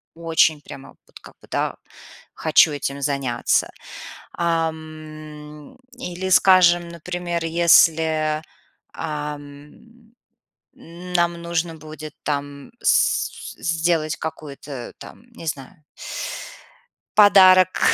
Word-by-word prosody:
очень 165 -2 +2
прямо 135 -1 -11 0.2
вот - - -15
как - - -14
бы, - - -18
да, - - -1 0.6
хочу 160 0 +4
этим 140 -1 -4
заняться. 135 -4 0 0.6
Ам, 155 - -5 0.2
или, 185 -3 -5
скажем, 175 -2 +5
например, 170 0 -4
если, 160 -2 +3 0.5
ам, 150 +9 -8 0.6
нам 175 0 -2
нужно 170 -1 -2
будет 155 -1 -10
там 145 -1 -4
с - - +2 0.2
с - - -16
сделать 165 -2 0
какой-то 145 -4 -8
там, 235 - -13
не 165 -8 -11
знаю, 140 +3 -5 1.4
подарок 185 -3 +6
160 Hz, 90 wpm, -22 LUFS, 150-175 Hz, 1.4 s, подарок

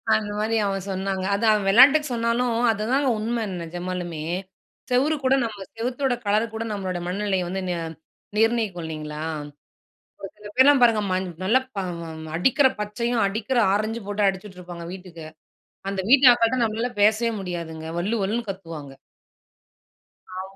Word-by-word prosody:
அந்த 210 -1 -2
மாதிரி 220 +1 0
அவன் 195 -2 -2
சொன்னாங்க. 190 0 -2
அதான் 220 +2 +3
அவன் 205 -2 0
வெளாட்டுக்கு 275 +8 +7
சொன்னாலும், 230 +1 0 0.2
அதுதாங்க 250 +7 0
உண்ம 230 +1 -1 0.2
நிஜமாலுமே. 175 -1 -5 0.7
செவுறு 275 +5 +2
கூட 260 +1 +3
நம்ம 210 -4 -5
செவத்தோட 250 +3 -1
கலர் 210 +2 +2
கூட 225 +1 -3
நம்மளோட 185 -3 -3
மனநிலையை 190 0 -1
வந்து 190 +1 -3
ந - - 0 0.6
நிர்ணயிக்கும் 220 -6 +1
இல்லைங்களா? 155 -1 -6 1.0
ஒரு 195 - -6
சில 210 0 -11
பேர்லாம் 275 +1 +6
பாருங்க, 230 -3 +5
ம - - +2 0.3
நல்லா 225 +7 +4 0.8
அடிக்கிற 265 - +4
பச்சையும் 230 +2 -1
அடிக்கிற 220 +5 -2 0.2
ஆரஞ்சும் 215 +1 -2
போட்டு 205 0 +1
அடிச்சுட்டுருப்பாங்க 180 -3 -5
வீட்டுக்கு. 180 -4 -10 0.7
அந்த 195 -1 -2
வீட்டு 270 0 +7
அக்காட்ட 230 +1 +2
நம்மளால 225 +3 -1
பேசவே 220 +2 +4
முடியாதுங்க. 170 -4 -5
வள்ளு 200 +7 -1
வள்ளுன்னு 220 +3 -2
கத்துவாங்க. 165 -7 -7 1.5
ஆமா. 190 +1 -8
210 Hz, 135 wpm, -24 LUFS, 185-235 Hz, 1.5 s, வெளாட்டுக்கு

